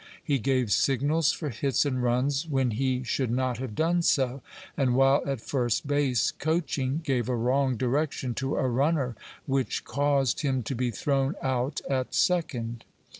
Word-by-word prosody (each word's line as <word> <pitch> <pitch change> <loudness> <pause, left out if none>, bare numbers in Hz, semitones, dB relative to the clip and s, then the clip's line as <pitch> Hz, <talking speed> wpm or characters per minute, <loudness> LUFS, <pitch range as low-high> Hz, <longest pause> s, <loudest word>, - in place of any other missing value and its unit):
He 140 -2 +1
gave 125 -1 0
signals 145 +6 +2
for 155 - -4
hits 135 +4 0
and 130 -3 -1
runs 130 +5 +1
when 135 -5 +1
he 130 +2 0
should 125 +1 -1
not 125 0 -1
have 130 -5 -5
done 170 +5 +2
so, 135 -4 +1 0.3
and 130 -3 +1
while 135 +1 +4
at 135 -5 -2
first 120 -3 -1
base, 140 -4 +1
coaching, 150 -2 -1
gave 130 -5 0
a 125 - +1
wrong 130 +2 +1
direction 130 +1 -1
to 135 +3 -2
a 130 - +1
runner 135 0 +1 0.3
which 135 -2 -1
caused 140 -3 +1
him 135 -4 0
to 125 - -3
be 125 0 -1
thrown 135 +5 0
out 130 +2 -1
at 130 -2 -1
second. 120 -10 0
135 Hz, 165 wpm, -27 LUFS, 125-140 Hz, 0.3 s, while